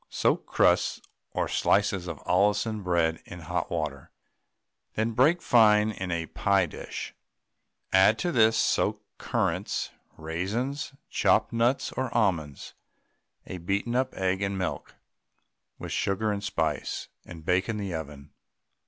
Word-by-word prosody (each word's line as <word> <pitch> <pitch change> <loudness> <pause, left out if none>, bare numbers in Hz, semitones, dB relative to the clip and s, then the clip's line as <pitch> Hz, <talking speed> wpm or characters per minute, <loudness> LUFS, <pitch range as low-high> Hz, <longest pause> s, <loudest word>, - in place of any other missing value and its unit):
Soak - - 0
crusts - - +2 0.3
or - - -1
slices 100 -3 +1
of 85 -4 -7
Allinson 105 +3 +2
bread 85 -3 +1
in 90 - -10
hot 85 +1 -3
water, 75 -5 -3 0.9
then 110 +2 0
break 150 +9 +3
fine 110 -2 +5
in 95 -3 -5
a 85 -1 -1
pie 90 +4 +2
dish, 80 - -7 0.8
add 95 +4 +6
to 175 - -1
this 110 -4 +4
soaked - - +1
currants, - - -1 0.3
raisins, 105 - -3 0.2
chopped - - +2
nuts 120 +3 +1
or 130 -2 -3
almonds, 85 - -1 0.7
a 90 - -7
beaten 100 +7 -1
up 130 +1 +1
egg, 95 0 0
and 100 -1 -1
milk, 95 -1 -4 0.8
with - - -7
sugar 105 +2 0
and 100 -1 -3
spice, 80 -7 -2 0.2
and 80 -2 -11
bake 95 +4 +1
in 110 - -1
the 100 -3 -4
oven. 75 -2 -7
95 Hz, 135 wpm, -27 LUFS, 85-110 Hz, 0.9 s, add